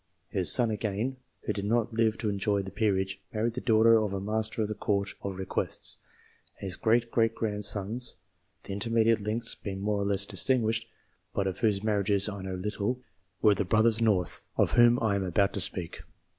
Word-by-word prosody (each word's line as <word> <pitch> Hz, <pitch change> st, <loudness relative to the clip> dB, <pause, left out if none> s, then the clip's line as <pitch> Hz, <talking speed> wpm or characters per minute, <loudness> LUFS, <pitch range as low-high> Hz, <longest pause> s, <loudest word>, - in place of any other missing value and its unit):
His 90 Hz, -3 st, +6 dB
son 120 Hz, -3 st, +5 dB
again 110 Hz, +5 st, -3 dB, 0.3 s
who -, -, -2 dB
did 100 Hz, -1 st, -4 dB
not 115 Hz, +2 st, 0 dB
live 110 Hz, -1 st, +1 dB
to 110 Hz, -, -2 dB
enjoy 100 Hz, 0 st, 0 dB
the 95 Hz, -, -8 dB
peerage 95 Hz, -2 st, -1 dB
married 115 Hz, +2 st, -1 dB
the 125 Hz, -, -4 dB
daughter 115 Hz, 0 st, +5 dB
of 105 Hz, -2 st, -2 dB
a 100 Hz, -, -2 dB
Master 110 Hz, +2 st, -2 dB
of -, -, -2 dB
the 105 Hz, -, -3 dB
Court 100 Hz, -1 st, -1 dB
of 95 Hz, -2 st, -5 dB
Requests, 95 Hz, 0 st, -3 dB, 0.6 s
and -, -, -8 dB
his 95 Hz, -1 st, -2 dB
great 115 Hz, +3 st, +1 dB
great 115 Hz, -1 st, +1 dB
grandsons 105 Hz, +2 st, 0 dB, 0.5 s
the -, -, -6 dB
inter 100 Hz, +4 st, -2 dB
mediate 115 Hz, -1 st, +3 dB
links 110 Hz, +3 st, -1 dB
being 95 Hz, -2 st, -6 dB
more 105 Hz, 0 st, -1 dB
or -, -, -1 dB
less 100 Hz, -1 st, +1 dB
distinguished, 115 Hz, +2 st, 0 dB, 0.5 s
but 100 Hz, -, 0 dB
of 95 Hz, -2 st, -3 dB
whose 105 Hz, -3 st, +1 dB
marriages 100 Hz, -2 st, +2 dB
I 100 Hz, -2 st, -5 dB
know 95 Hz, -1 st, -5 dB
little 105 Hz, +5 st, -3 dB, 0.4 s
were 105 Hz, -2 st, +6 dB
the 100 Hz, -, -1 dB
brothers 110 Hz, +3 st, +2 dB
North, 100 Hz, -6 st, 0 dB, 0.2 s
of -, -, +2 dB
whom 120 Hz, 0 st, +5 dB
I 110 Hz, -3 st, +2 dB
am 100 Hz, -, -1 dB
about 100 Hz, +2 st, +1 dB
to 100 Hz, -, -1 dB
speak. 85 Hz, +2 st, -1 dB
105 Hz, 200 wpm, -28 LUFS, 100-115 Hz, 0.6 s, His